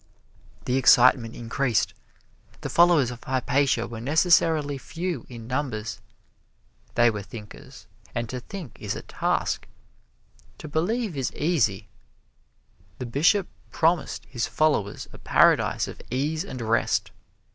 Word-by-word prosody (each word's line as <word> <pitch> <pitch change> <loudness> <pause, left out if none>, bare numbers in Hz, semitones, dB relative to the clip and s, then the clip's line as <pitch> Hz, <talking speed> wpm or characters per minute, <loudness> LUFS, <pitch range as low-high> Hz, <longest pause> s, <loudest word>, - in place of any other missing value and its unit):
The 125 - +1
excitement 125 -2 +5
increased. 120 +1 0 0.7
The - - -4
followers 170 -7 +5
of 120 - -10
Hypatia 130 -1 +1
were 115 -1 -7
necessarily 155 0 +3
few 175 +5 -5
in 115 -3 -9
numbers. 120 -5 -3 0.9
They 120 -1 +5
were 105 -2 -5
thinkers 105 +1 -11 0.3
and 120 0 -2
to 125 - -4
think 170 - -9
is - - -3
a - - -7
task. - - -1 0.9
To - - -9
believe 180 +6 -1
is 135 -2 -2
easy. 115 - 0 1.1
The 125 - -5
Bishop 165 - +2 0.2
promised 165 -2 0
his 120 -3 -3
followers 145 -10 0
a - - -12
paradise - - +3
of - - -9
ease 150 +5 -1
and 130 -2 -7
rest. 115 +1 +1
130 Hz, 125 wpm, -25 LUFS, 115-160 Hz, 1.1 s, excitement